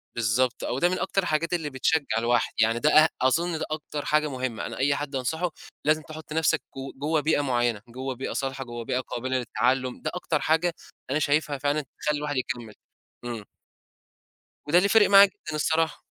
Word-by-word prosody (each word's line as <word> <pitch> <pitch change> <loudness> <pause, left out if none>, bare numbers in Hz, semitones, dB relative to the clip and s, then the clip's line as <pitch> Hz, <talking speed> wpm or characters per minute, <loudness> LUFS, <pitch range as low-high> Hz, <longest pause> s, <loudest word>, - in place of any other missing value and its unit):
بالضبط، 120 +2 +1
آه - - -2
وده 135 +8 +2
من 185 - -1
أكتر 195 0 0
الحاجات 165 +1 0
اللي 160 -4 -1
بتشجع 135 -2 0
الواحد 120 0 +1
يعني 115 +1 +3
ده 150 - +3
أه 155 +1 +6
أظن 160 +5 +1
ده - - -2
أكتر 150 -1 -4
حاجة 155 0 +2
مُهمة، 130 -4 -3
أنا - - -6
أي 140 +1 +2
حد 145 -1 -4
أنصحه 160 +7 -1 0.3
لازم 155 +1 +3
تحُط 155 0 -9
نفسك 160 -1 +2 0.2
ج 135 0 -7
جوّا 155 +2 +1
بيئة 155 0 +2
معيّنة، 120 -5 0
جوّا 130 +2 -5
بيئة 130 +2 -5
صالحة، 135 -1 -3
جوا 120 -2 -7
بيئة 125 - -1
قابلة 130 +1 -3
للتعلم. 125 +2 0
ده - - -2
أكتر 165 -4 -1
حاجة 160 +4 +2 0.4
أنا 145 +3 +1
شايفها 145 -1 +1
فعلًا 145 +2 0 0.2
تخلّي 150 -1 0
الواحد 145 -1 -3
يكمل. 120 -4 -4 0.5
إمم. 115 -4 -5 1.2
وده 165 - +4
اللي 195 +3 +4
فارِق 220 -1 +5
معايا 200 0 +9
جدًا 160 -5 -7
الصراحة. 160 +1 0
145 Hz, 190 wpm, -26 LUFS, 125-160 Hz, 1.2 s, معايا